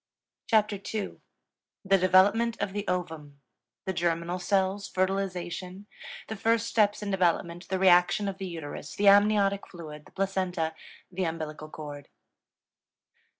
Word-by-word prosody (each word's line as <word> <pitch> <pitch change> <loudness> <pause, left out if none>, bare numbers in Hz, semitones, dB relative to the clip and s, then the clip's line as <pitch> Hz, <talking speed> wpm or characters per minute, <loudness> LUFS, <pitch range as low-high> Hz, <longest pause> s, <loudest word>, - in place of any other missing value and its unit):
CHAPTER 215 -3 +3
II 205 +1 -5 0.7
THE 195 0 +4
DEVELOPMENT 200 +6 +4
OF 195 - -2
THE 205 0 -4
OVUM 160 -6 -4 0.5
The 190 - -1
Germinal 170 0 -1
Cells 195 +2 0
Fertilization 185 0 -2 0.4
The 220 - -4
First 225 +2 +1
Steps 210 -2 +2
in 200 - -3
Development 175 -1 0
The 190 - 0
Reaction 185 +2 +4
of 195 -1 -4
the 190 - -4
Uterus 155 -3 -7
The 205 - +1
Amniotic 200 0 +4
Fluid 155 -4 -10
The - - -19
Placenta 185 -4 -1 0.4
The 185 0 -2
Umbilical 155 -1 -5
Cord. 145 -2 -8
185 Hz, 130 wpm, -28 LUFS, 170-200 Hz, 0.7 s, THE